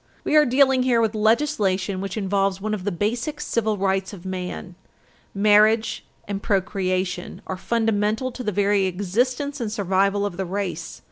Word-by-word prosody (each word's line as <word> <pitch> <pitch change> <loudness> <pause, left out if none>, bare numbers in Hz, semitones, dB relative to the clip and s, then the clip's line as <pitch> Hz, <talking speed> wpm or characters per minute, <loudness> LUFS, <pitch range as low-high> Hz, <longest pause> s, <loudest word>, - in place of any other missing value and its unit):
We - - 0
are 300 -2 +6
dealing 265 +1 +4
here 250 -2 +3
with 225 -1 +1
legislation 210 -5 +1
which 195 +2 -4
involves 195 -1 0
one 215 +2 -3
of 195 -3 -4
the 205 - 0
basic 235 - -2
civil 220 -6 -1
rights 195 0 0
of 190 -2 -11
man. 185 -1 -5 0.6
Marriage 215 +2 +3 0.2
and 200 -1 -3
procreation 185 -3 -1
are 190 - -4
fundamental 220 +3 0
to 250 - -8
the 210 - -1
very 200 0 +2
existence 245 +10 -1
and 220 -3 -2
survival 200 0 +1
of 190 -4 -4
the 190 - -2
race. 180 -3 -4
205 Hz, 160 wpm, -23 LUFS, 190-230 Hz, 0.6 s, are